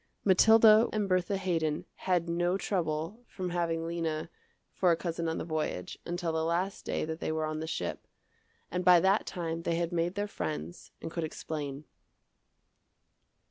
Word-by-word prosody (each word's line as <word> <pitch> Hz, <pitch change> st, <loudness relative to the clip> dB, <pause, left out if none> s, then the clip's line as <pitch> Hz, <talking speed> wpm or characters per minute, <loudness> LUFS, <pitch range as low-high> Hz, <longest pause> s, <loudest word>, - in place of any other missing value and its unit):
Mathilda 220 Hz, +3 st, +7 dB
and 210 Hz, -2 st, 0 dB
Bertha 185 Hz, +1 st, +1 dB
Haydon 165 Hz, -5 st, -1 dB
had 180 Hz, -2 st, 0 dB
no 175 Hz, +2 st, +1 dB
trouble 175 Hz, +3 st, -2 dB
from 185 Hz, -2 st, -5 dB
having 165 Hz, -2 st, -1 dB
Lena 165 Hz, -1 st, -2 dB, 0.4 s
for 185 Hz, -, +2 dB
a 170 Hz, -, +5 dB
cousin 165 Hz, -1 st, -3 dB
on 160 Hz, -, -2 dB
the -, -, -3 dB
voyage, 155 Hz, -, -3 dB
until 175 Hz, -1 st, -2 dB
the 160 Hz, 0 st, 0 dB
last 175 Hz, +5 st, -1 dB
day -, -, -1 dB
that 160 Hz, +1 st, -5 dB
they -, -, -2 dB
were 155 Hz, 0 st, -1 dB
on 155 Hz, 0 st, -3 dB
the 160 Hz, -, -4 dB
ship, -, -, -4 dB, 0.6 s
and 180 Hz, +1 st, -1 dB
by 180 Hz, -1 st, +7 dB
that 195 Hz, +4 st, +2 dB
time 165 Hz, -2 st, -3 dB
they 165 Hz, 0 st, 0 dB
had 170 Hz, 0 st, -1 dB
made 175 Hz, +2 st, 0 dB
their 205 Hz, 0 st, -1 dB
friends 80 Hz, -, -5 dB
and -, -, -4 dB
could 170 Hz, -, -3 dB
explain. 150 Hz, -2 st, -5 dB
170 Hz, 170 wpm, -30 LUFS, 160-185 Hz, 0.6 s, Mathilda